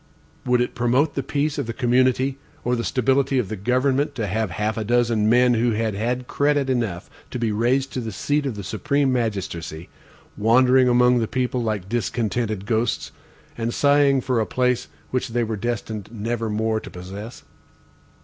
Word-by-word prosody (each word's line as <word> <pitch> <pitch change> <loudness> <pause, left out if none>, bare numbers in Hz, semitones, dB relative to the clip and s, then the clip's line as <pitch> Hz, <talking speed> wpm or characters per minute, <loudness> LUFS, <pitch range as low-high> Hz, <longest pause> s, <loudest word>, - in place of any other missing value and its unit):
Would 125 0 +3
it 125 - -1
promote 125 +5 +2
the 135 - -1
peace 145 +2 -1
of - - -2
the 115 - -3
community, 130 +2 +2 0.2
or 125 +1 +1
the 115 - -2
stability 135 +2 +1
of 115 -7 0
the 110 - -3
government 130 +7 +1
to 115 - -2
have 110 +2 -1
half 105 +5 -2
a 110 - -2
dozen 115 -1 +2
men 125 +1 +5
who 115 0 +2
had 110 0 -1
had 120 +5 -2
credit 145 -2 +1
enough 110 -8 -2 0.2
to - - -4
be 115 -2 0
raised 125 +5 +1
to - - -2
the 115 -2 -4
seat 145 +8 -1
of 125 - -3
the 100 - -6
supreme 135 +7 0
magistracy, 95 -8 -3 0.5
wandering 125 +4 +4
among 125 0 +4
the 115 - 0
people 125 0 -1
like 105 -5 -2
discontented 110 -1 -2
ghosts, 115 +2 -1 0.4
and 115 0 -3
sighing 140 -1 +4
for 125 -2 0
a 110 - 0
place 125 -1 0 0.2
which 130 +1 -1
they 120 0 0
were 110 -1 -2
destined 110 -1 -4
never 115 0 -3
more 110 +1 0
to - - -10
possess? 100 +6 -9
120 Hz, 180 wpm, -23 LUFS, 110-130 Hz, 0.5 s, men